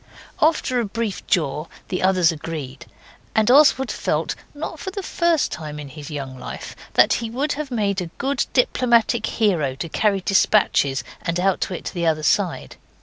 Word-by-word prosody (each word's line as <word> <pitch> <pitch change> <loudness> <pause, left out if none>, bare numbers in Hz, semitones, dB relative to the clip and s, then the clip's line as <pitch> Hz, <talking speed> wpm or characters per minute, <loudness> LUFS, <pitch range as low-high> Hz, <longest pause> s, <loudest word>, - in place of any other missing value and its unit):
After 300 -5 +2
a 235 - 0
brief 215 -1 -3
jaw 155 -1 0 0.2
the 185 - -2
others 185 -3 +4
agreed, 150 -4 -7 0.5
and 220 +2 +4
Oswald 265 -2 +5
felt, - - -1 0.2
not 310 +1 -6
for 380 - -4
the 395 +1 -5
first 340 -4 +1
time 150 -2 -6
in 145 -2 -8
his 145 0 -9
young 135 -4 -6
life, - - -7 0.2
that - - +6
he 230 - -4
would 275 +6 -1
have 300 -1 -5
made 200 -5 0
a 175 - -4
good 280 0 -1
diplomatic 235 -3 +2
hero 170 - +1
to 165 +5 -5
carry 200 +2 +1
despatches 185 -8 +2 0.2
and 170 +1 -2
outwit 185 -1 -1
the 170 -2 -1
other 155 -1 +1
side. - - 0
195 Hz, 165 wpm, -22 LUFS, 155-250 Hz, 0.5 s, that